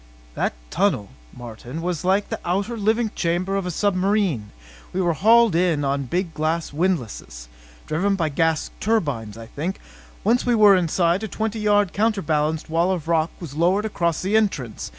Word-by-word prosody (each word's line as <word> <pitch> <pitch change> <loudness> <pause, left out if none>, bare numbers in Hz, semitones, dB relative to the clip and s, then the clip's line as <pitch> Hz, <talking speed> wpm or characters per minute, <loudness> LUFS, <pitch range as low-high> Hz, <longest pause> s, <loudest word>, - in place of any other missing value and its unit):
"That - - -1 0.2
tunnel, 185 - +1 0.2
Martin, 120 +4 -8
was 175 -3 -2
like 195 +3 +1
the - - -3
outer 200 +7 -1
diving 220 +1 +1
chamber 180 +3 -1
of 195 -2 -1
a - - -2
submarine. 190 - 0 0.4
We 185 - -1
were 175 -2 +2
hauled 225 +5 +5
in 165 -4 +1
on 140 +1 0
a - - -3
big 175 +7 -1
windlass 155 - -2 0.4
driven 195 +6 0
by 165 -5 0
gas 160 +2 0
turbines, 140 - -1
I 115 - -8
think. 160 - -4 0.4
Once 235 +4 +2
we 245 -1 +2
were 210 -3 +7
inside, 175 +1 +1
a 220 - -3
twenty 220 +1 -3
yard, 205 -3 +2
counterbalanced 160 -8 0
wall 170 +3 +1
of 170 -4 -3
rock 165 -1 +2
was 165 -6 -8
lowered 180 +7 +2
across 170 -6 -1
the 195 +3 0
entrance. 150 - -1
180 Hz, 170 wpm, -22 LUFS, 155-205 Hz, 0.4 s, were